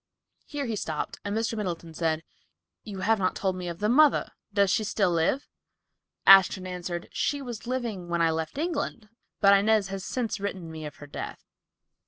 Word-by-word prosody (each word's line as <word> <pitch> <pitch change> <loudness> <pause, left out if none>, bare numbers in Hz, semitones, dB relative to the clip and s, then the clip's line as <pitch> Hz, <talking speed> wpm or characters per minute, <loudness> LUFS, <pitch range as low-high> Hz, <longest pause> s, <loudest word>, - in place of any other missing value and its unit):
Here 290 -2 -3
he 230 -3 -2
stopped 155 -6 -4
and 205 +1 -2
Mr. 225 0 -1
Middleton 175 -6 -4
said, 160 -1 -1 0.6
"You 200 -3 -7
have 220 +1 +2
not 185 -1 +1
told 190 -2 -1
me 180 -1 -5
of 170 -1 -4
the 210 - 0
mother. 290 +5 +4 0.2
Does 200 -2 +3
she 220 - +2
still 200 -3 +1
live?" 170 +11 +1 0.8
Ashton 195 -1 +7
answered, 180 -1 -5
"She 285 - 0
was 240 -4 -7
living 230 -8 -3
when 170 0 0
I 165 -1 +3
left 160 - -3
England, 290 -9 -2 0.3
but 200 -1 +7
Inez 205 0 +3
has 195 -1 -5
since 230 -4 -2
written 190 -4 -4
me 155 -1 -6
of 145 - -10
her 145 - -11
death." - - -7
195 Hz, 185 wpm, -27 LUFS, 175-225 Hz, 0.8 s, Ashton